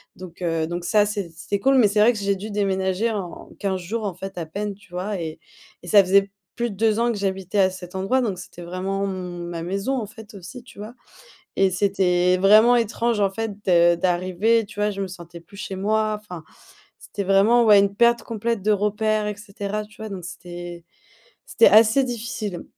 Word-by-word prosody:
Donc, 185 Hz, -1 st, -12 dB
heu, 165 Hz, -2 st, 0 dB
donc 175 Hz, +1 st, -4 dB
ça 210 Hz, +2 st, +3 dB
c'é 205 Hz, -4 st, -4 dB
c'était 195 Hz, +4 st, -4 dB
cool 270 Hz, +4 st, +3 dB
mais 235 Hz, -5 st, +6 dB
c'est 205 Hz, +1 st, 0 dB
vrai 225 Hz, +3 st, +6 dB
que -, -, -6 dB
j'ai 200 Hz, 0 st, 0 dB
dû 200 Hz, +3 st, -7 dB
déménager 195 Hz, +1 st, 0 dB
en 195 Hz, -5 st, -6 dB
15 190 Hz, -2 st, -2 dB
jours 215 Hz, +6 st, -4 dB
en 195 Hz, -4 st, -3 dB
fait 190 Hz, +1 st, -8 dB
à 165 Hz, -, -4 dB
peine, 205 Hz, +5 st, -4 dB
tu 205 Hz, -1 st, -22 dB
vois? 190 Hz, +2 st, -3 dB
Et 160 Hz, -1 st, -6 dB, 0.4 s
et -, -, -11 dB
ça 200 Hz, +2 st, +6 dB
faisait 195 Hz, +1 st, +3 dB, 0.2 s
plus 240 Hz, -1 st, -2 dB
de -, -, -9 dB
2 220 Hz, +1 st, +1 dB
ans 235 Hz, +1 st, +2 dB
que 225 Hz, -, -4 dB
j'habitais 195 Hz, 0 st, -2 dB
à 190 Hz, -1 st, +5 dB
cet 180 Hz, -1 st, -10 dB
endroit 195 Hz, +8 st, +1 dB
donc 200 Hz, -7 st, -2 dB
c'était 175 Hz, -1 st, -11 dB
vraiment 190 Hz, +3 st, -3 dB
mon 180 Hz, -2 st, -5 dB
ma 170 Hz, -1 st, -5 dB
maison 195 Hz, +8 st, -2 dB
en 225 Hz, -4 st, -3 dB
fait, 220 Hz, 0 st, -13 dB
aussi, 195 Hz, +7 st, -10 dB
tu 210 Hz, -4 st, -16 dB
vois? 215 Hz, +3 st, -8 dB, 0.6 s
Et 195 Hz, -1 st, +3 dB
c'était 180 Hz, -1 st, +2 dB
vraiment 215 Hz, +6 st, +6 dB
étrange 230 Hz, 0 st, 0 dB
en 200 Hz, -1 st, +2 dB
fait 225 Hz, +3 st, -3 dB, 0.2 s
de 175 Hz, -1 st, +5 dB
d'arriver, 185 Hz, +6 st, +1 dB
tu 205 Hz, 0 st, -14 dB
vois, 210 Hz, 0 st, +2 dB
je 200 Hz, -1 st, -6 dB
me 195 Hz, -, -4 dB
sentais 175 Hz, -1 st, -11 dB
plus 185 Hz, +4 st, -17 dB
chez 195 Hz, -, -5 dB
moi, 215 Hz, +2 st, 0 dB
enfin, 180 Hz, -6 st, -10 dB, 0.5 s
c'était 205 Hz, -, -6 dB
vraiment, 200 Hz, +5 st, +4 dB
ouais, 210 Hz, -2 st, +7 dB
une 200 Hz, 0 st, 0 dB
perte 235 Hz, +1 st, +3 dB
complète 230 Hz, -1 st, -3 dB
de 210 Hz, +2 st, +2 dB
repère 210 Hz, +1 st, 0 dB
et 210 Hz, -, -4 dB
cetera, 200 Hz, +1 st, -5 dB
tu 210 Hz, 0 st, -19 dB
vois? 220 Hz, -, -5 dB
Donc 185 Hz, -3 st, -7 dB
c'était 175 Hz, 0 st, -9 dB, 0.6 s
c'était 230 Hz, -, +4 dB
assez 225 Hz, +5 st, +5 dB
difficile 230 Hz, -6 st, -5 dB
200 Hz, 215 wpm, -23 LUFS, 185-215 Hz, 0.6 s, ouais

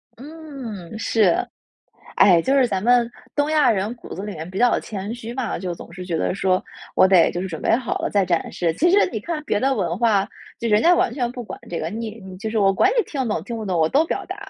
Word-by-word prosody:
嗯， 265 Hz, -, -9 dB
是。 215 Hz, -5 st, +2 dB, 0.7 s
哎， 175 Hz, -4 st, +6 dB
就 265 Hz, +11 st, +1 dB
是 270 Hz, -2 st, +4 dB
咱 190 Hz, -5 st, -2 dB
们 240 Hz, +1 st, +3 dB, 0.2 s
东 290 Hz, +1 st, +1 dB
亚 305 Hz, -3 st, +4 dB
人 210 Hz, +2 st, -1 dB
骨 -, -, -10 dB
子 190 Hz, -, -6 dB
里 205 Hz, 0 st, -5 dB
面 160 Hz, -1 st, -7 dB
比 190 Hz, -, -5 dB
较 245 Hz, 0 st, +3 dB
谦 205 Hz, +1 st, -5 dB
虚 235 Hz, 0 st, -7 dB
嘛， 260 Hz, -3 st, -3 dB
就 180 Hz, -2 st, -4 dB
总 170 Hz, -, -12 dB
是 180 Hz, +1 st, -8 dB
觉 170 Hz, -2 st, -2 dB
得 160 Hz, -, -1 dB
说， 185 Hz, -1 st, +1 dB, 0.3 s
我 -, -, +6 dB
得 185 Hz, -3 st, +5 dB
就 175 Hz, -, -4 dB
是 -, -, -3 dB
准 160 Hz, -4 st, -6 dB
备 -, -, +3 dB
好 245 Hz, -2 st, -3 dB
了 -, -, -2 dB
再 200 Hz, -2 st, +2 dB
展 175 Hz, -2 st, -1 dB
示。 170 Hz, -2 st, -1 dB
其 345 Hz, -, +3 dB
实 405 Hz, +3 st, +5 dB
你 220 Hz, -, -3 dB
看 310 Hz, +6 st, -4 dB
别 210 Hz, -, 0 dB
的 270 Hz, 0 st, +2 dB
文 175 Hz, -3 st, -2 dB
化， 210 Hz, -4 st, +3 dB, 0.3 s
就 235 Hz, -, -3 dB
人 215 Hz, -1 st, +3 dB
家 350 Hz, +1 st, +6 dB
完 235 Hz, -, +1 dB
全 245 Hz, -3 st, -2 dB
不 245 Hz, -1 st, -7 dB
管 -, -, -8 dB
这 170 Hz, -, -3 dB
个， 160 Hz, -, -3 dB
你 225 Hz, +1 st, -6 dB
你 190 Hz, -1 st, -10 dB
就 220 Hz, +3 st, -4 dB
是 225 Hz, -, -4 dB
我 195 Hz, -1 st, +4 dB
管 195 Hz, -, +3 dB
你 -, -, +5 dB
听 290 Hz, -4 st, -5 dB
得 255 Hz, -, -1 dB
懂 160 Hz, -, -4 dB
听 235 Hz, -, -5 dB
不 220 Hz, -2 st, -5 dB
懂， 180 Hz, -3 st, 0 dB
我 160 Hz, -, +4 dB
都 285 Hz, -, +3 dB
表 395 Hz, -, -3 dB
达。 375 Hz, +2 st, -7 dB
215 Hz, 290 characters per minute, -22 LUFS, 185-250 Hz, 0.7 s, 哎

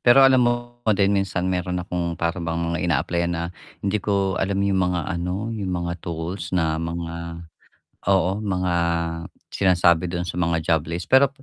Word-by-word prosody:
Pero 130 Hz, +2 st, +7 dB
alam 130 Hz, -1 st, +6 dB
mo 120 Hz, 0 st, -3 dB, 0.2 s
din 100 Hz, 0 st, +3 dB
minsan 95 Hz, -2 st, 0 dB
meron 90 Hz, -1 st, -1 dB
akong 85 Hz, -1 st, -3 dB
para 85 Hz, +2 st, -1 dB
bang 85 Hz, 0 st, -2 dB, 0.2 s
mga 85 Hz, -, -1 dB
ina-apply-an 85 Hz, 0 st, +1 dB
na 85 Hz, -, -2 dB, 0.4 s
hindi 105 Hz, +2 st, +1 dB
ko 100 Hz, -1 st, 0 dB
alam 95 Hz, +1 st, 0 dB
yung 95 Hz, -1 st, +2 dB
mga 90 Hz, -1 st, +1 dB
ano, 90 Hz, +6 st, -3 dB
yung 105 Hz, -4 st, -3 dB, 0.2 s
mga 85 Hz, -, -2 dB
tools 85 Hz, +2 st, -5 dB
na 80 Hz, -2 st, +1 dB
mga 85 Hz, 0 st, -5 dB, 0.6 s
oo, 95 Hz, +1 st, +3 dB
mga 90 Hz, -4 st, -1 dB, 0.8 s
sinasabi 85 Hz, -2 st, +3 dB
dun 85 Hz, 0 st, -2 dB
sa 90 Hz, 0 st, -3 dB
mga 85 Hz, -1 st, +2 dB
job 80 Hz, -1 st, +2 dB
list, 85 Hz, +2 st, -5 dB
pero 135 Hz, +1 st, +7 dB
90 Hz, 170 wpm, -23 LUFS, 85-100 Hz, 0.8 s, Pero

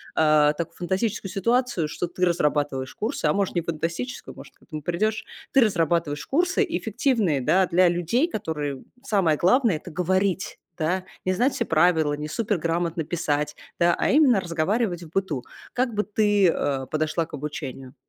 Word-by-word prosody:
а, 150 Hz, -1 st, +4 dB
так 165 Hz, +1 st, -5 dB
фантастическую 195 Hz, +3 st, -2 dB
ситуацию, 230 Hz, -2 st, 0 dB
что 170 Hz, +3 st, -3 dB
ты 180 Hz, +1 st, -1 dB
разрабатываешь 145 Hz, -6 st, 0 dB
курсы, 220 Hz, -5 st, -3 dB
а 150 Hz, -, +3 dB
может, 200 Hz, -2 st, 0 dB
не 170 Hz, -, 0 dB
фантастическую, 170 Hz, -, -4 dB
может, -, -, -13 dB
к -, -, -27 dB
этому 155 Hz, -3 st, -7 dB
придёшь. 210 Hz, +7 st, -1 dB, 0.3 s
Ты 270 Hz, -, +5 dB
разрабатываешь 165 Hz, -7 st, +1 dB
курсы 360 Hz, +7 st, +1 dB
эффективные, 220 Hz, -, 0 dB
да, 185 Hz, +8 st, +3 dB
для 180 Hz, 0 st, +4 dB
людей, 175 Hz, -, +1 dB
которые, 150 Hz, -, -4 dB, 0.2 s
самое 190 Hz, -, +2 dB
главное- 230 Hz, +1 st, +3 dB
это 155 Hz, +3 st, -8 dB
говорить, 185 Hz, +3 st, 0 dB, 0.2 s
да? 180 Hz, +4 st, 0 dB, 0.2 s
Не 185 Hz, -, +2 dB
знать 250 Hz, +8 st, +2 dB
все -, -, -1 dB
правила, 160 Hz, -2 st, +3 dB
не 150 Hz, +1 st, -4 dB
суперграмотно 170 Hz, -4 st, -1 dB
писать, 150 Hz, -2 st, -1 dB, 0.2 s
да, 170 Hz, 0 st, +4 dB
а -, -, +1 dB
именно 270 Hz, -8 st, +5 dB
разговаривать 175 Hz, +2 st, -1 dB
в 160 Hz, -, -11 dB
быту. 165 Hz, -8 st, -2 dB, 0.3 s
Как 250 Hz, -2 st, 0 dB
бы 210 Hz, -, 0 dB
ты, 205 Hz, -2 st, +3 dB
э, 135 Hz, -4 st, -1 dB
подошла 155 Hz, +2 st, 0 dB
к -, -, -23 dB
обучению? 135 Hz, -3 st, -6 dB
175 Hz, 165 wpm, -24 LUFS, 155-210 Hz, 0.3 s, Ты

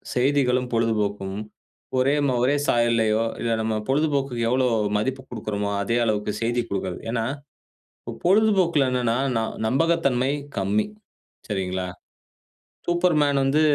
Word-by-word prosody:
செய்திகளும், 125 Hz, -1 st, +2 dB
பொழுதுபோக்கும், 105 Hz, -4 st, 0 dB, 0.6 s
ஒரே 135 Hz, +3 st, +3 dB
ம 130 Hz, -, +1 dB
ஒரே 135 Hz, +3 st, +3 dB
சாயல்லயோ, 115 Hz, -2 st, +2 dB, 0.2 s
இல்ல 115 Hz, -, 0 dB
நம்ம 110 Hz, 0 st, -1 dB
பொழுதுபோக்குக்கு 135 Hz, -4 st, +1 dB
எவ்ளோ 130 Hz, +1 st, +2 dB, 0.3 s
மதிப்பு 130 Hz, +5 st, -2 dB
கொடுக்கிறோமோ, 105 Hz, -3 st, -3 dB
அதே 115 Hz, +4 st, 0 dB
அளவுக்கு 105 Hz, -1 st, 0 dB
செய்தி 120 Hz, +1 st, 0 dB
கொடுக்கிறது. 95 Hz, -2 st, -3 dB
ஏன்னா, 115 Hz, -1 st, -1 dB, 1.0 s
பொழுதுபோக்குல 185 Hz, -8 st, +3 dB
என்னன்னா, 120 Hz, -2 st, +1 dB, 0.2 s
ந -, -, +1 dB, 0.3 s
நம்பகத்தன்மை 140 Hz, -2 st, +2 dB, 0.3 s
கம்மி. 100 Hz, +2 st, +1 dB, 0.6 s
சரிங்களா? 95 Hz, -2 st, -2 dB, 1.0 s
சூப்பர்மேன் 165 Hz, -5 st, +2 dB
வந்து 140 Hz, +3 st, +2 dB
120 Hz, 110 wpm, -24 LUFS, 110-140 Hz, 1.0 s, ஒரே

